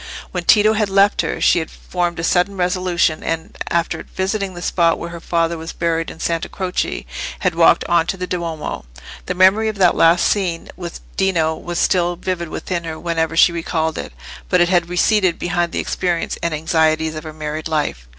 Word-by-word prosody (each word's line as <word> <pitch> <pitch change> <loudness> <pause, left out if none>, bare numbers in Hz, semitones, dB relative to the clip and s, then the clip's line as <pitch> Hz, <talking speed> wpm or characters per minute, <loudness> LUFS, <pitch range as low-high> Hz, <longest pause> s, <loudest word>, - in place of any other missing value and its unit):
When 180 -2 -4
Tito 215 +2 +5
had 215 -2 0
left 195 +1 +4
her, - - -3
she - - +4
had 160 - -4
formed 175 -1 -3
a 165 - -4
sudden 180 +3 +1
resolution, 180 -3 +1
and 165 0 -3
after 170 0 -1
visiting 190 0 -3
the 175 - -7
spot 170 -2 +2
where 170 - -6
her 170 - -7
father 165 0 -1
was 165 +1 -7
buried 165 -1 -1
in - - -11
Santa 165 0 -2
Croce, 185 -1 -3 0.4
had 185 -2 +1
walked 165 0 +4
on 170 -1 +2
to 190 - -2
the 180 - -3
Duomo. 170 - -4 0.4
The 180 - -2
memory 190 +4 +4
of 215 - -5
that 185 -3 +5
last 165 +1 +4
scene 180 -5 0
with 170 -2 -7 0.2
Dino 165 -5 +1
was 175 +2 -6
still 175 -1 +2
vivid 175 -1 -3
within 175 0 -4
her 160 -1 -6
whenever 165 -1 -1
she 175 - +6
recalled 160 -1 -2
it, - - -6 0.4
but - - +3
it 175 - +4
had 175 -2 +2
receded 185 0 +2
behind 175 -1 -1
the - - -4
experience 175 -2 -1
and 170 - -1
anxieties 160 0 +1
of 155 - -6
her 155 - -7
married 155 0 -5
life. 150 - -2
170 Hz, 200 wpm, -19 LUFS, 165-185 Hz, 0.4 s, she